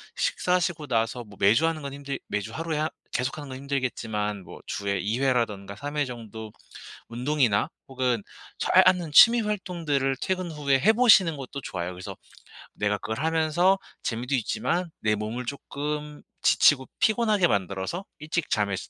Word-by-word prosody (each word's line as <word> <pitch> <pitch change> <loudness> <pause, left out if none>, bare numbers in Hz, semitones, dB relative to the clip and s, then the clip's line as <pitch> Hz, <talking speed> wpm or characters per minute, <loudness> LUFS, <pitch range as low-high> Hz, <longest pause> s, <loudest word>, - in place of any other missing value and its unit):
식사하시고 180 - 0
나서 115 0 0
뭐 105 -1 -14
매주 115 +11 +5
하는 160 -1 -2
건 140 -1 -5
힘들 140 0 -5
매주 105 -1 -3
하루에 165 -1 -3
하 155 +1 0 0.2
계속하는 135 +3 -3
건 130 - -6
힘들겠지만 115 -7 -2
뭐 - - -11
주에 100 -1 -2
2 105 +6 -1
회라든가 115 -7 0
3 145 +8 -6
회 145 - +2
정도 110 -3 -8 0.6
운동이나 120 -3 +1 0.2
혹은 125 -4 0 0.4
잘 - - +5
아는 175 -4 +3
취미 235 +9 +8
활동들을 170 -10 -1
퇴근 185 -2 -2
후에 140 -3 +1
해 210 +11 +5
보시는 210 -9 +5
것도 140 0 -7
좋아요. 90 -5 -4
그래서 90 0 -8 0.6
내가 105 0 0
그걸 110 +4 -5
하면서 160 +4 +2 0.3
재미도 120 +4 -3
있지만 170 +8 -1
내 110 -1 +2
몸을 110 +4 -4
쪼끔 150 +2 -5 0.2
지치고 135 -3 +4
피곤하게 215 -5 +3
만들어서 100 - -2
일찍 155 +1 -2
잠에스 100 -4 -1
135 Hz, 335 characters per minute, -26 LUFS, 110-160 Hz, 0.6 s, 취미